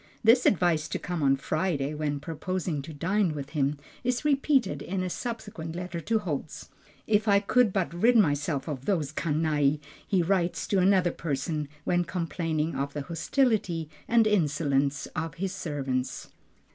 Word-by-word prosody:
This 235 +3 +6
advice 170 -5 +2
to - - -2
come 175 -2 -4
on 135 -1 +4
Friday 150 0 -1
when 150 -1 -2
purposing 165 0 -3
to 145 - -9
dine 180 +4 +1
with 140 -2 -6
him, 145 -1 0 0.3
is 250 +3 -1
repeated 280 -2 +2
in 185 0 -2
a 180 - -3
subsequent 205 -10 -5
letter 180 -1 -4
to 225 +7 +1
Holz. 160 -7 -4 0.4
"If 215 0 +2
I 200 -1 +6
could 225 +2 +3
but 185 -3 -1
rid 230 +8 +4
myself 145 -6 +1
of 135 -4 -5
these 160 -8 0
canaille," 150 -2 +1 0.3
he 185 -3 +2
writes 180 -1 0
to 195 - +3
another 185 -1 +4
person, 150 -1 -2 0.2
when 175 0 +2
complaining 165 -3 -2
of 140 +1 -2
the 145 - -3
hostility 170 - 0 0.2
and 230 -1 +4
insolence 145 -7 +1
of 165 +1 -3
his 185 +1 -3
servants. 135 -5 -3
170 Hz, 160 wpm, -28 LUFS, 150-195 Hz, 0.4 s, This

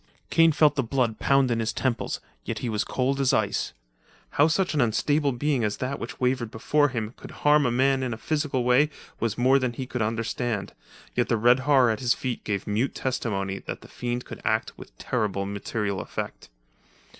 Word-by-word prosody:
Kane 165 0 +6
felt 150 0 +4
the 135 - +2
blood 120 -2 0
pound 135 -2 +3
in 115 - +1
his 110 -1 0
temples, 125 +1 -2 0.2
yet 115 - -4
he 120 - -3
was 105 -2 -2
as - - -2
cold 135 +2 0
as 135 -2 +3
ice. - - 0 0.6
How 145 - +4
such 175 +2 +1
an 150 - +2
unstable 140 +6 +2
being 135 0 0
as 105 -1 -1
that 130 +2 -3
which 115 - -7
wavered 125 -2 0
before 145 +6 +2
him 115 -3 -4
could - - -10 0.2
harm 150 -2 +5
a - - +1
man 135 +2 +2
in 130 -2 -2
a 110 - -4
physical 145 -1 -1
way 125 +5 +4 0.3
was 115 -3 -1
more 130 +3 +4
than 130 -2 -1
he 130 +2 -5
could 125 -1 -4
understand, 115 0 -2 0.4
yet - - +1
the 115 - +2
red 120 +4 +5
horror 130 -3 +4
at 110 - -2
his 120 -2 +2
feet 125 -3 -4
gave 100 -2 -2
mute 110 +6 -1
testimony 100 -7 -2
that - - -7
the - - -13
fiend 120 0 -4
could - - -9
act 110 0 0
with - - -13
terrible 105 -5 -1
material 100 0 -3
effect. - - -6
125 Hz, 205 wpm, -26 LUFS, 110-135 Hz, 0.6 s, Kane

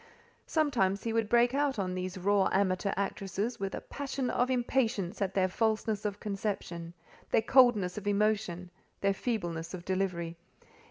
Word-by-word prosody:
Sometimes 235 - +1
he 230 - -1
would 225 -2 +1
break 240 +1 +4
out 280 -2 +1
on 185 -2 -1
these 185 0 -4
raw 195 +1 +3
amateur 190 0 +1
actresses 200 +3 -2
with 195 0 -3
a - - -5
passion 275 -2 -3
of 245 +1 +1
impatience 235 -7 0
at 195 -1 -1
their 190 -1 +3
falseness 220 +1 0
of 205 -1 -2
conception, 190 -5 -4 0.3
their 220 - +3
coldness 225 -7 +4
of 205 - -9
emotion, 200 -4 0 0.3
their 200 0 +3
feebleness 175 -7 -3
of 175 -1 -9
delivery. 180 -3 -1
200 Hz, 155 wpm, -31 LUFS, 185-230 Hz, 0.3 s, break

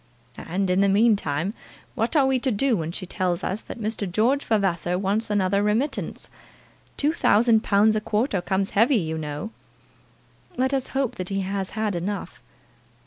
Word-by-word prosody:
"And, 185 +2 -1
in 185 +2 +3
the 200 - +4
meantime, 200 -5 +2 0.4
what 230 +4 -1
are 285 -3 +5
we 265 -1 +2
to 260 - 0
do 245 +2 +1
when 165 -4 -3
she 185 - -4
tells 180 -1 -2
us 200 +4 -2
that - - -9
Mr. 210 -3 -3
George 245 +9 +2
Vavasor 180 -5 0
wants 205 +4 -1
another 200 -1 +1
remittance? 225 +8 -1 0.7
Two 295 +2 +1
thousand 225 -6 +4
pounds 215 +2 +3
a 215 - 0
quarter 210 -2 0
comes 190 +2 -1
heavy, 230 +7 +4
you 160 -4 -2
know!" 150 +7 -5 1.1
"Let 260 +2 +1
us 265 -1 0
hope 270 -4 -1
that 185 -1 -4
he 195 0 -1
has 195 0 -3
had 215 -3 0
enough." 195 +4 -4
205 Hz, 170 wpm, -24 LUFS, 185-230 Hz, 1.1 s, are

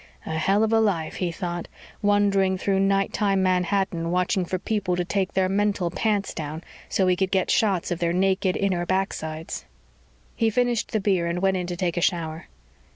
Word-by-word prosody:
A - - -5
hell 195 +7 +2
of 220 0 +1
a 225 - +5
life, 190 -8 0
he 180 -2 -1
thought, 175 0 -4 0.3
wandering 200 -2 +3
through 195 +1 0
nighttime 195 0 +1
Manhattan 180 -2 0
watching 180 +1 +1
for 185 - -2
people 195 -2 -1
to 175 0 -1
take 195 +1 -1
their 190 -1 +2
mental 195 -2 0
pants 205 +1 0
down 155 +1 -5 0.3
so 190 - +2
he 185 0 +3
could 190 +1 0
get 190 -1 +1
shots 195 -6 +1
of 175 - -1
their 170 -1 +1
naked 190 +1 +1
inner 185 -3 0
backsides. 165 -4 -3 0.7
He 225 -1 +2
finished 245 0 0
the 220 - +1
beer 190 -4 +1
and 170 +1 -1
went 190 0 +2
in 180 -1 -3
to 175 - -3
take 175 -1 -1
a - - +1
shower. 165 -2 -1
190 Hz, 190 wpm, -24 LUFS, 175-200 Hz, 0.7 s, a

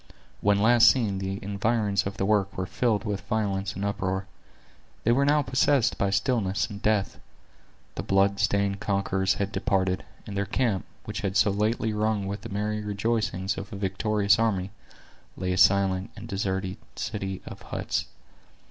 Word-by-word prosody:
When 100 0 +3
last 115 +2 +7
seen, 105 -7 +1
the 95 0 -3
environs 100 0 0
of 100 - -6
the 95 - 0
works 100 -2 +1
were 95 - -1
filled 105 -1 0
with 100 -2 -3
violence 100 -2 -1
and 100 - -3
uproar. 95 -1 -2 0.8
They 115 - +3
were 135 +4 +3
now 145 +1 +3
possessed 130 -2 +2
by 100 - +2
stillness 100 -2 +1
and 100 -1 -8
death. 105 -2 0 0.7
The - - -4
blood 100 0 +2
stained 100 -1 +1
conquerors 100 -1 0
had 100 0 -2
departed; 95 -4 0 0.2
and 105 - -7
their 100 0 -1
camp, 110 -3 0 0.2
which - - -4
had 95 0 -1
so 105 0 +4
lately 110 +2 0
rung 105 -1 0
with 100 +1 -4
the - - -8
merry 105 +1 -2
rejoicings 105 -2 -1
of 100 - -8
a - - -6
victorious 100 +1 +1
army, 100 -4 0 0.7
lay 90 0 -1
a - - -2
silent 95 -1 +4
and - - -9
deserted 95 0 -2 0.2
city 95 -3 -4
of - - -9
huts. - - -3
100 Hz, 165 wpm, -27 LUFS, 95-110 Hz, 0.8 s, last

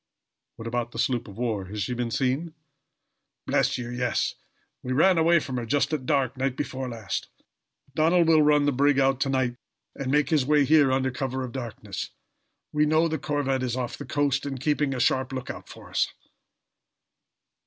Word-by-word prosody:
"What 115 - -8
about 120 0 -2
the - - -8
sloop 120 0 0
of 100 0 -11
war? 110 -5 -1
Has 105 +2 -4
she 125 - -2
been 120 -1 -2
seen?" 135 +7 -1 0.9
"Bless - - +1
you, 125 - -5
yes. 125 0 0 0.5
We 130 - -3
ran 170 +5 +4
away 170 +1 +5
from 135 -5 -2
her, 120 - -3
just 145 +4 +1
at 130 -4 -2
dark 135 -4 +1
night 130 0 -1
before 130 -2 -3
last. 110 -4 -4 0.7
Donald 165 +3 +3
will 160 -1 +6
run 150 -1 +4
the 145 - +3
brig 140 +1 +3
out 135 -1 +3
to 135 - 0
night, 130 -2 0 0.4
and 135 -2 -4
make 150 +3 +2
his 150 -4 +4
way 145 +1 +3
here 145 -2 +5
under 130 0 +1
cover 130 0 -3
of 125 - -5
darkness. 120 -4 -6 0.6
We 150 0 +3
know 155 +2 +3
the 160 -2 -2
corvette 140 -3 -1
is 125 -2 -1
off 125 -2 -3
the 145 - -8
coast, 145 +1 0
and 135 -2 -4
keeping 145 0 0
a - - -3
sharp 130 +1 +1
lookout 130 -1 -6
for - - -12
us." - - +2
135 Hz, 190 wpm, -26 LUFS, 125-145 Hz, 0.9 s, will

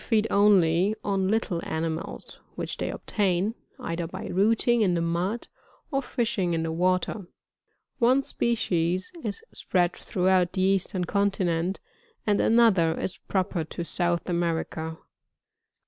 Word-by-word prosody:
feed 220 -2 +2
only 195 -1 +4
on 195 -2 0
little 200 -5 0
animals 160 0 -4 0.2
which - - -4
they - - -2
obtain, 195 0 0 0.3
either 170 0 -3
by - - -7
rooting 225 +5 +2
in 185 -4 +3
the - - +1
mud, 175 +7 -1 0.4
or 275 -1 +1
fishing 220 -9 -1
in 165 - -1
the 165 - -2
water 185 +3 0 0.7
One 255 +3 +4
species 185 -8 0
is 210 -3 -3
spread 175 -1 0
throughout 185 -3 +1
the 185 - -1
eastern 190 -1 +1
continent, 185 -2 0 0.5
and 205 -1 +2
another 200 -8 +4
is 185 - -3
proper 185 -3 -1
to 170 +2 -6
South 175 0 -1
America. 165 -2 -2
185 Hz, 130 wpm, -26 LUFS, 170-205 Hz, 0.7 s, only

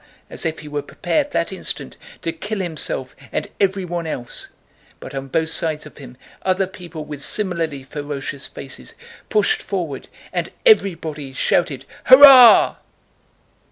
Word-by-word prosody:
as - - -2
if 160 - -4
he 150 - -11
were 145 0 -3
prepared 280 - -2
that - - -2
instant - - -5 0.3
to 165 - -1
kill 205 +6 -5
himself 155 -7 -3 0.2
and - - -2
everyone 185 -4 -1
else, 125 -6 -6 0.5
but - - -10
on 135 0 -5
both 160 +4 -1
sides 155 -2 0
of 150 - -14
him 125 -3 -12 0.2
other 190 +1 +1
people 170 -4 -9
with 145 -2 -8
similarly 165 -7 0
ferocious 140 0 -6
faces 130 - -10 0.3
pushed 210 -1 +1
forward 170 -9 -4 0.3
and - - -2 0.2
everybody 160 - +2
shouted 135 -1 0 0.2
"hurrah!" 260 -2 +9
160 Hz, 135 wpm, -20 LUFS, 145-190 Hz, 0.5 s, hurrah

